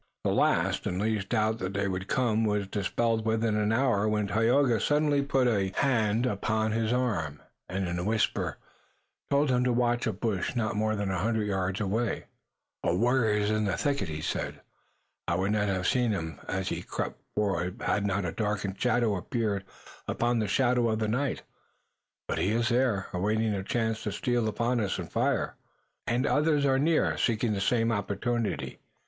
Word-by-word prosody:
The - - +1
last - - +2
and 90 - -2
least 105 -1 -1
doubt 110 -1 +1
that 95 +2 -4
they 100 0 0
would 95 0 -3
come 115 -3 +1
was 105 -2 +1
dispelled 110 +3 0
within 110 0 +1
an 105 0 +1
hour 110 -4 +2
when 105 -1 +1
Tayoga 115 +3 +3
suddenly 145 -1 +2
put 135 -2 +1
a 100 -5 +1
hand 115 -4 +2
upon 110 0 0
his 110 0 0
arm, 100 - -1 0.3
and, 95 0 -2
in 85 0 -2
a - - -2
whisper, 110 +2 0 0.7
told 140 0 +3
him 125 0 +2
to 125 - +2
watch 120 0 +1
a - - +1
bush 105 +2 -2
not 110 -2 0
more 110 +1 +1
than 100 -2 -2
a 95 - -1
hundred 110 +2 0
yards 95 -1 -1
away. 105 +3 -1 0.6
"A 85 - +2
warrior 115 0 +2
is 105 0 +1
in 110 0 +1
the 100 - 0
thicket," 140 - 0
he 75 0 -4
said. - - -3 0.7
"I 85 - +1
would 95 +3 0
not 105 -1 +1
have 95 -2 -1
seen 125 -2 +2
him 80 -6 -4
as 95 0 -2
he - - -3
crept - - -5
forward 95 -3 -1
had 100 - +1
not 100 -1 0
a 85 - -1
darker 105 -2 -2
shadow 120 -2 +1
appeared 105 -1 -2 0.4
upon 120 0 +1
the 110 - 0
shadow 120 +2 +2
of 110 - 0
the 110 0 -1
night. 125 +6 -1 0.8
But - - -1
he - - +1
is 115 +1 +1
there, 120 -6 +1
awaiting 105 +4 +1
a 100 - -2
chance 110 +2 -1
to 105 - -3
steal 120 +1 0
upon 120 +3 0
us 100 -3 -1
and - - -6
fire." - - 0 0.5
"And 120 +3 +1
others 150 -1 +2
are 135 -1 +3
near, 155 +3 +2
seeking 115 -1 +1
the 100 - -2
same 115 +2 +2
opportunity." 110 +2 -2
110 Hz, 190 wpm, -28 LUFS, 100-120 Hz, 0.8 s, Tayoga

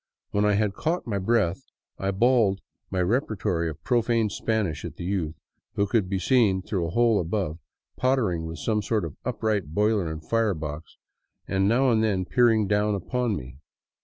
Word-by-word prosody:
When 105 +1 +2
I 105 - +3
had 105 -1 +1
caught 165 - -2
my 105 -5 -2
breath 95 -3 +1 0.4
I 95 - -1
bawled 105 -1 +3 0.3
my 95 -1 -1
repertory 100 - 0
of 75 - -9
profane 115 -3 +1
Spanish 100 -11 -1
at - - -6
the - - -7
youth, 85 -4 -2 0.4
who 100 - +2
could 100 -3 0
be 95 - 0
seen 100 -3 +2
through 90 -5 -2
a - - -4
hole 115 +2 +3
above 85 -2 -2 0.4
pottering 110 -11 +1
with 80 0 -6
some 105 +2 0
sort 105 -2 0
of 80 - -7
upright 105 - -2
boiler 105 -5 +2
and 80 0 -8
firebox 80 -9 -2 0.5
and 95 0 +1
now 130 +3 +3
and 110 -1 +3
then 95 -4 +1
peering 115 +1 +3
down 105 +1 +2
upon 120 +3 -1
me. 65 -4 -8
100 Hz, 175 wpm, -26 LUFS, 90-115 Hz, 0.5 s, I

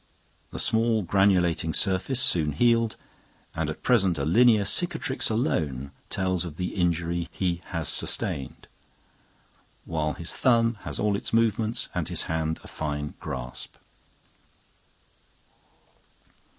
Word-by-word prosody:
The - - -8
small 115 -1 +2
granulating 90 -4 +2
surface 95 +7 +1
soon 80 - +3
healed, 115 +5 +2 0.6
and 80 -1 -2
at 75 - -7
present 95 -9 +3
a 70 - -1
linear 110 +4 +4
cicatrix 160 - +1
alone 75 - -1 0.2
tells 95 -2 -1
of 80 -3 -8
the 90 - -3
injury 85 -1 -1
he 90 -2 -2
has 85 -3 -3
sustained, 65 -3 -1 1.2
while 75 -2 -2
his 85 - -1
thumb 115 -3 +2
has - - -3
all 105 -1 +1
its 100 - -4
movements 115 0 +1
and - - -2
his - - 0
hand 80 0 -2
a - - -12
fine 75 -1 -4
grasp. 60 -1 -6
90 Hz, 120 wpm, -26 LUFS, 80-115 Hz, 1.2 s, linear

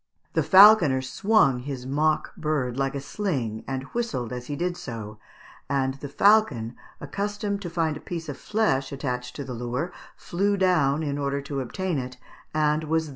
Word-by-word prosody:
The - - +2
falconer 185 -9 +7
swung 165 - +3
his 130 -1 -6
mock 155 +3 0
bird 145 -6 -1
like 135 +1 -1
a - - -2
sling, 135 - -3
and 135 -1 -3
whistled 135 - -2
as 125 0 -6
he 145 - -3
did 175 +3 -1
so, 110 -7 -7 0.5
and 135 -1 +1
the 145 - -6
falcon, 145 - +3 0.2
accustomed 200 +5 -3
to 175 - -5
find 165 -2 0
a - - -7
piece 165 -2 -6
of 145 - -4
flesh 140 -12 0
attached 125 -3 -4
to 145 - -5
the 130 -2 -6
lure, 125 +8 -3 0.2
flew 200 +3 -1
down 160 -6 +2
in 145 -1 -2
order 140 0 -1
to 140 -1 -4
obtain 175 +5 -2
it, 125 0 -6 0.3
and 155 0 +1
was 160 +1 +1
thus - - -8
secured. - - -9
145 Hz, 180 wpm, -25 LUFS, 130-180 Hz, 0.5 s, falconer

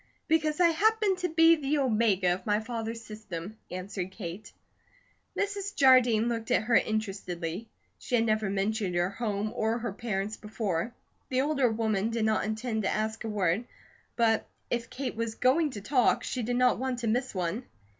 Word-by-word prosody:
"Because 310 -1 +1
I 345 -1 +6
happened 410 +2 +2
to 360 -1 -1
be 325 +1 +6
the 295 0 0
omega 215 -8 +2
of 180 - -6
my 210 0 +3
father's 230 0 -5
system," 210 -2 -7
answered 185 0 -4
Kate. 190 +1 -8 0.9
Mrs. 400 0 -2
Jardine 250 -4 +5
looked 230 -2 -2
at - - +3
her 230 +2 -1
interestedly. 200 -3 -1 0.3
She 250 - -1
had 230 -1 +3
never 215 -2 +1
mentioned 200 -1 -1
her 175 +2 +1
home 210 -1 -2
or 220 +2 0
parents 210 -1 -3
before. 210 0 -3 0.3
The 260 0 +2
older 275 -3 +2
woman 220 -2 0
did 230 -1 0
not 220 -1 +1
intend 220 +1 -2
to 195 - 0
ask 220 +1 -2
a 225 - -3
word, 200 +1 0 0.5
but 225 -2 +2 0.2
if 235 -1 -1
Kate 255 -2 -4
was 230 0 -3
going 295 +5 +3
to 205 - -6
talk, 250 +4 +2
she 255 - -3
did 245 +2 -1
not 250 -1 +3
want 260 -1 -1
to 230 - -1
miss 245 +1 0
one. 185 +7 -2
225 Hz, 175 wpm, -29 LUFS, 205-255 Hz, 0.9 s, I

